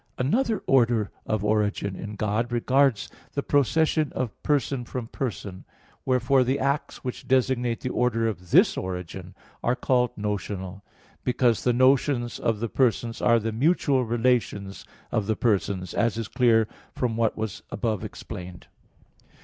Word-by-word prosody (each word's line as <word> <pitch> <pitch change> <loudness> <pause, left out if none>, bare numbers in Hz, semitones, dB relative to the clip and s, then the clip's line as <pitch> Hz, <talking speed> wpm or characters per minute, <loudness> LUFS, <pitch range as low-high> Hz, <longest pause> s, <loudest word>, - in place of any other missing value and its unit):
Another 220 - +1
order 120 -5 +3 0.2
of 110 -1 -1
origin 105 -2 0
in 105 +2 -7
God 110 +3 -1
regards 125 0 +2 0.3
the 140 - -1
procession 155 +2 +2
of 125 -5 -4
person 140 -3 0
from 120 0 -5
person; 105 -6 -5 0.4
wherefore 130 +1 +3
the 130 +2 0
acts 140 +2 -2
which 125 -2 -6
designate 125 -3 +1
the 130 - -2
order 115 -2 +1
of 90 -5 -5
this - - +5
origin 90 0 -6 0.3
are 120 - +2
called 125 -2 +2
notional; 100 -2 -4 0.4
because 120 -2 +2
the 125 - +3
notions 130 -1 +2
of 110 -2 0
the 115 - 0
persons 115 -2 0
are 115 -1 +5
the 115 0 -2
mutual 135 +1 +2
relations 115 -4 0 0.3
of 105 -3 0
the 110 - +1
persons, 100 -4 0
as 115 -1 +1
is 115 -2 -3
clear 115 -3 +3 0.3
from 120 -3 -1
what 115 -1 +1
was 110 -2 -4
above 110 -5 -2
explained 90 -1 -8
(Q. - - -22
115 Hz, 150 wpm, -25 LUFS, 105-130 Hz, 0.4 s, this